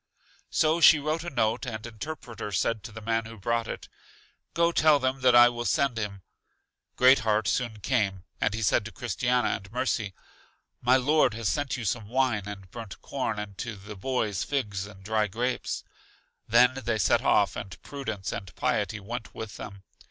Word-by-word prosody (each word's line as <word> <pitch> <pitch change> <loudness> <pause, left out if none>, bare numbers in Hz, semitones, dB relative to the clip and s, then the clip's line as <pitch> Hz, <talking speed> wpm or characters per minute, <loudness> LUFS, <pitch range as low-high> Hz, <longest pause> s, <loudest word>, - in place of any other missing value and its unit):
So 160 +2 +2
she 155 - +9
wrote 155 +3 -2
a 175 - -4
note, 115 -2 0
and 110 -2 -5
Interpreter 115 -2 -7
said 110 +4 0
to 115 - -7
the 110 +1 -9
man 115 0 0
who 115 0 -10
brought 115 +3 -1
it: - - -6 0.7
Go, 170 0 +3
tell 155 -3 +5
them 130 0 -1
that 125 -1 +5
I 120 0 +9
will 120 0 -2
send 125 -1 +1
him. 100 -3 -5 0.7
Great 130 +2 +6
heart 110 -2 +1
soon 110 +5 -1
came, 100 -6 0 0.2
and 105 - +1
he 110 - -3
said 100 - +3
to 110 - -6
Christiana 125 +1 0
and 95 0 -4
Mercy, 115 -5 -1 0.7
My 125 +2 +5
Lord 135 -3 +3
has 115 -2 -1
sent 145 -2 -1
you 120 - -5
some 105 +1 -1
wine 120 -5 +1
and 95 -3 -8
burnt 115 -4 -8
corn, 130 -6 -2
and 105 -1 -6
to 115 0 -4
the 105 +2 -10
boys 105 -2 -1
figs 100 -9 -2
and 95 -2 -14
dry 110 +1 +1
grapes. 120 +5 -2 0.6
They 120 +3 +7
then 125 -3 -1
set 105 - +3
off, - - +3
and 95 -2 -7
Prudence 110 -9 -5
and 95 - -7
Piety 110 -4 0
went 115 +4 -7
with 110 -3 -7
them. 100 -2 -9
115 Hz, 185 wpm, -27 LUFS, 105-130 Hz, 0.7 s, she